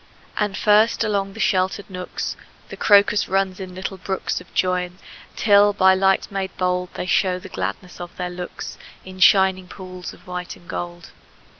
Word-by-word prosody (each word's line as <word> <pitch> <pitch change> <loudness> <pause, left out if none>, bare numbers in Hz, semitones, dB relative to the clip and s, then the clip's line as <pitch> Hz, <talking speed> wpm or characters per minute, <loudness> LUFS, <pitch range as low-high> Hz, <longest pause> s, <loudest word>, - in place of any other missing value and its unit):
And 210 -2 0
first, 215 +2 +4
along 200 -2 -1
the - - -11
sheltered 190 +1 +1
nooks, 180 -2 -5 0.3
The - - -7
crocus 205 0 +4
runs 190 0 0
in 185 -1 -7
little 190 +1 -5
brooks 190 +1 -3
Of - - -17
joyance, 180 0 0 0.4
till 205 -1 +5
by 190 -1 +5
light 190 +1 +2
made 195 -1 -4
bold 180 0 0
They - - -3
show 185 0 +2
the 180 - -10
gladness 100 - -5
of 175 0 -9
their 180 -1 -3
looks 180 0 -7 0.3
In 185 0 -10
shining 190 0 +5
pools 185 -1 -8
of - - -17
white 180 -1 -5
and 175 - -19
gold. 175 0 -6
185 Hz, 170 wpm, -22 LUFS, 180-195 Hz, 0.4 s, till